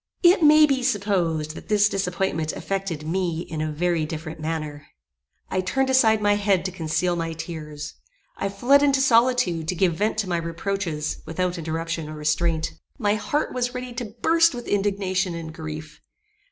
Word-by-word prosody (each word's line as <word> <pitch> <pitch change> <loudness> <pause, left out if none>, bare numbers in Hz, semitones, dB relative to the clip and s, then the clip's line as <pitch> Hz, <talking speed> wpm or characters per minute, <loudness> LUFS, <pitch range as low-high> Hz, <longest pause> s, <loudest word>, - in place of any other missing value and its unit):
It 355 +2 +6
may 305 0 +8
be 275 -3 +1
supposed 185 -10 0
that - - -11
this 210 -1 +4
disappointment 180 -5 -1
affected 195 -6 -3
me 170 -1 -1
in 160 -3 -5
a 155 0 -1
very 170 +1 0
different 155 +1 -6
manner. 155 -2 -4 0.6
I 185 - +1
turned 265 +9 0
aside 220 -5 +4
my 205 0 +4
head 200 -3 +1
to 185 - -1
conceal 175 +1 -1
my 165 -1 -2
tears. 155 -3 -7 0.4
I 195 - -2
fled 245 +8 +4
into 280 -2 +3
solitude, 235 -10 +3
to 180 - -1
give 180 -1 +2
vent 210 +6 -1
to 215 -3 0
my 175 -1 0
reproaches, 170 -2 -3
without 180 +1 -2
interruption 165 0 -3
or 155 - -7
restraint. 155 +2 0 0.3
My 205 -5 +1
heart 290 +8 -1
was 250 0 -1
ready 250 0 -5
to 235 -3 -6
burst 330 -3 +4
with 240 - -7
indignation 195 -3 0
and 160 -1 -6
grief. 155 -1 -8
180 Hz, 170 wpm, -24 LUFS, 160-215 Hz, 0.6 s, may